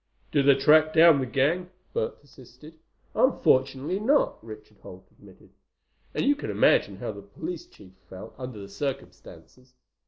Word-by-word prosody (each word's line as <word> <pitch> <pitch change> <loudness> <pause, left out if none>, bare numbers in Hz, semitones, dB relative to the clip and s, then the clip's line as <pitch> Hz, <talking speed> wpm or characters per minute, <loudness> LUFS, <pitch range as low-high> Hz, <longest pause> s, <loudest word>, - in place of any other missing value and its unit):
"Did 140 -1 +1
they 140 - +7
track 155 +3 +4
down 165 -2 +6
the 130 - -3
gang?" 155 +8 0 0.2
Bert 110 - -3
persisted. 145 +3 -17 0.3
"Unfortunately 135 +7 +1
not," 290 - +1
Richard 420 0 -12
Holt - - -13
admitted. - - -20 0.6
"And - - -1
you 285 +1 +3
can 295 - -7
imagine - - +2
how - - -5
the - - -11
police 350 +1 -8
chief 95 - -18 0.2
felt, 95 +4 -11
under 125 -4 -8
the 100 - -9
circumstances. 130 +1 -8
140 Hz, 150 wpm, -26 LUFS, 130-175 Hz, 0.6 s, they